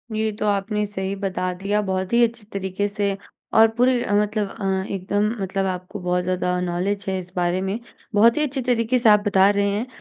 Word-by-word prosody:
ये 220 0 0
तो - - -1
आपने 210 +1 0
सही 195 -1 -4
बता 185 -2 -2
दिया। 200 +3 -1
बहुत 190 0 -2
ही 240 0 +5
अच्छी 230 -1 -1
तरीके 195 +1 -2
से 200 -1 -2 0.4
और 225 0 +7
पूरे 250 0 +3
अ, - - -2
मतलब 210 -1 0
अ, 190 -2 -2
एकदम 200 +2 0
मतलब 195 0 -1
आपको 185 +2 -4
बहुत 180 0 0
ज़्यादा 180 0 -1
नॉलेज 180 +3 -2
है 190 - -1
इस 180 -1 -10
बारे 180 +1 0
में। 195 +4 -2 0.4
बहुत 230 +6 +5
ही 300 - +2
अच्छे 275 -2 -2
तरीके 245 0 +1
से 235 - +4
आप 210 0 +7
बता 195 -1 +5
रहे 200 0 +1
हैं। 210 +5 -2
200 Hz, 210 wpm, -22 LUFS, 190-215 Hz, 0.4 s, और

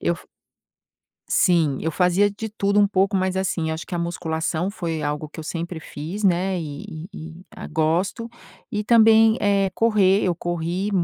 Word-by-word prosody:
eu - - +1
f - - -17 1.0
Sim, 160 -7 +2
eu 160 - -1
fazia 180 +4 +3
de 220 +2 -6
tudo 205 -1 +1
um 205 - +4
pouco, 195 0 +1
mas 185 0 0
assim, 175 -4 -1
acho 160 +1 -5
que - - -6
a 175 - -1
musculação 170 0 -2
foi 170 -6 -4
algo 150 +1 -3
que 155 - -14
eu 160 - -6
sempre 170 +1 -4
fiz, 165 +8 -6
né, 185 0 +2
e 145 -3 -7 0.2
e 165 -4 -8
e 185 - -19
a - - -8
gosto. 170 +9 0 0.4
E 210 - -2
também, 225 0 +5
eh, 200 -1 +2
correr, 210 -3 +3
eu 180 -2 +1
corri 175 +4 -3
180 Hz, 180 wpm, -22 LUFS, 165-200 Hz, 1.0 s, também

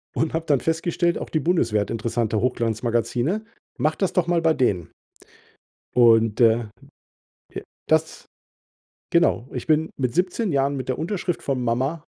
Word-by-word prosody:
Und 160 - 0
habe 160 0 -1
dann 140 -4 +3
festgestellt, 170 +1 0
auch - - -6
die 155 - 0
Bundeswehr 125 - +1
hat 100 - -4
interessante 115 -1 -1
Hochglanzmagazine. 120 - -1 0.3
Mach 155 +1 +1
das 190 - -1
doch 175 -2 +1
mal 170 -1 +2
bei 160 -1 +3
denen. 95 - 0 1.0
Und, 115 -2 +4
äh, 115 0 +4 0.9
ja, - - -5 0.3
das 160 0 0 0.9
Genau, 165 -7 +2
ich 125 - -5
bin 160 0 +2
mit 125 -3 -1
17 185 +2 0
Jahren 140 0 +1
mit 130 -2 -5
der 130 - -2
Unterschrift 175 0 -2
von 130 -3 -2
Mama 130 +7 -1
135 Hz, 155 wpm, -23 LUFS, 115-165 Hz, 1.0 s, Und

